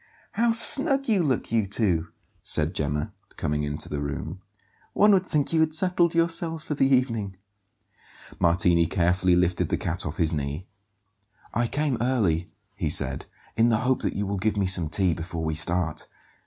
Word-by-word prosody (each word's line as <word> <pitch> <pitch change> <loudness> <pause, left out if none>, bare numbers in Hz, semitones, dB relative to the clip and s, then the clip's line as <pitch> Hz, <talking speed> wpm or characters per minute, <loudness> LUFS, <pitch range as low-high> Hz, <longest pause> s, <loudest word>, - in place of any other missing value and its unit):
"How 235 0 +1
snug 275 +4 +6
you 210 -5 +2
look, 135 -7 -2
you 110 -3 0
two!" 95 -5 -1 0.3
said 75 +2 0
Gemma, 75 0 -3 0.2
coming 75 0 -2
into 75 +1 -4
the 75 -1 -5
room. 80 +5 -6 0.5
"One 210 +1 +4
would 190 -2 +2
think 150 +1 -1
you 160 - +2
had 160 -1 +1
settled 175 -1 +1
yourselves 165 -1 0
for 150 - -4
the 135 -2 +1
evening." 115 -7 0 1.0
Martini 85 0 +2
carefully 90 +1 +1
lifted 90 0 0
the - - -1
cat - - -3
off - - -6
his 80 0 +1
knee. 75 +3 -4 0.9
"I 120 +1 0
came 145 -2 -2
early," 100 -10 0 0.3
he - - -3
said, - - +2 0.3
"in 115 +1 +3
the 110 - +2
hope 130 +1 0
that - - -3
you 100 - -2
will 100 0 -3
give 105 +2 -1
me 100 - 0
some 90 -4 +2
tea 90 0 +3
before 80 0 -6
we 80 0 -2
start. 80 +1 0
100 Hz, 175 wpm, -24 LUFS, -, 1.0 s, snug